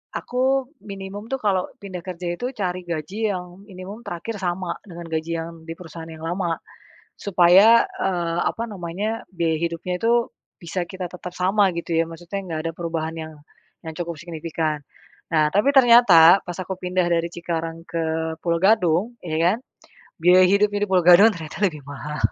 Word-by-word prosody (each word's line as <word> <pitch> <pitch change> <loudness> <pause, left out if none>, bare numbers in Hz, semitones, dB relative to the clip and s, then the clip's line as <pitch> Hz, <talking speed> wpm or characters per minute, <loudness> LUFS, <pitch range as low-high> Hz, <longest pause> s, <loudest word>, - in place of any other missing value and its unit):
aku 265 +2 0 0.2
minimum 195 +2 -7
tuh - - +1
kalo 190 -3 +1
pindah 190 -3 -6
kerja 180 -1 -5
itu 245 - -4
cari 185 -2 -2
gaji 190 +7 -2
yang 180 +1 -8
minimum 195 +2 -9
terakhir 200 +5 -5
sama 180 -1 -2
dengan 175 -1 -9
gaji 160 +1 -2
yang 165 +1 -5 0.2
di 165 - -4
perusahaan 165 -1 -10
yang 160 0 -10
lama 170 0 -1 0.6
supaya, 195 +5 +6
eee, 175 -3 -1
apa 230 - -4
namanya 200 +5 -4
biaya 165 -3 0
hidupnya 170 +2 -3
itu 235 +1 +2 0.3
bisa 175 +1 -3
kita 185 -2 -6
tetap 180 0 -8
sama 195 +2 +3
gitu 170 0 -5
ya 165 - +3
maksudnya 175 +4 -6
gak 160 -2 -3
ada - - -4
perubahan 165 -1 -3
yang 160 0 -7 0.5
yang 160 -2 -7
cukup 170 -1 -3
signifikan. 160 -2 -3 0.6
Nah, 155 -1 +4
tapi 210 - +2
ternyata 230 -9 +8
pas 175 0 -6
aku 190 0 -5
pindah 180 -1 0
dari 170 -1 +1
Cikarang 165 -1 -4
ke 160 -1 -2
Pulo 170 0 0
Gadung, 200 +2 +2
ya 160 -2 -2
kan 180 +6 +3 0.6
biaya 180 +2 +7
hidupnya 205 +1 +2
di - - -16
Pulo 185 -1 +4
Gadung 180 +5 +8
ternyata 160 +3 -8
lebih 155 -6 -2
mahal. 145 +1 -6
180 Hz, 165 wpm, -23 LUFS, 165-195 Hz, 0.6 s, ternyata